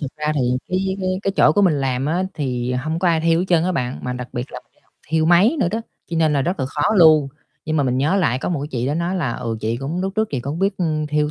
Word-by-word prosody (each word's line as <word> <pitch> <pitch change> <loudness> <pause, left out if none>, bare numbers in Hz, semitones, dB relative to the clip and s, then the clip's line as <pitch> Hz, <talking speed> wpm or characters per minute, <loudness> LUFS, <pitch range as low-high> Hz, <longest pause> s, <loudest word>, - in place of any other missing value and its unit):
thực 140 -3 -5
ra 150 0 -1
thì 145 - 0 0.3
cái 190 +1 -1
cái 185 0 -1
cái 195 - 0
chỗ 150 - +5
của 205 - +2
mình 175 -5 +4
làm 130 0 -1
á, 170 +4 0
thì 125 -4 -2
hông 155 +6 -2
có 180 -1 +2
ai 165 -1 +2
thêu 165 0 +2
hết 180 - 0
trơn 170 -2 +3
á 185 - 0
bạn. 125 -7 -2
Mà 125 - -3
đặc 125 0 -6
biệt 120 +2 -5
là - - -7
mình - - -43
đi - - -33
học - - -38 0.2
thêu 160 0 +1
máy 185 - +5
nữa - - +2
đó, 225 +5 -2 0.3
cho 165 - -2
nên 160 -2 +3
là 140 -2 +1
rất 175 -1 -2
là 130 - 0
khó 145 +2 -3
luôn. 155 -5 +6 0.4
Nhưng 155 0 -1
mà 145 - +2
mình 130 -1 0
nhớ 150 +8 +2
lại 145 -10 +1
có - - -3
một 165 -6 -1
cái 145 - -5
chị 125 -1 -2
đó 145 - 0
nói 170 +3 -1
là, 145 -9 -1
"Ừ, 115 -1 -4
chị 115 +2 -1
cũng 140 +8 -4
lúc 190 +1 -2
trước 220 0 +1
chị 135 - -2
cũng 140 +6 -4
biết 195 +1 +1 0.3
thêu 150 0 0
155 Hz, 315 wpm, -20 LUFS, 135-180 Hz, 0.4 s, luôn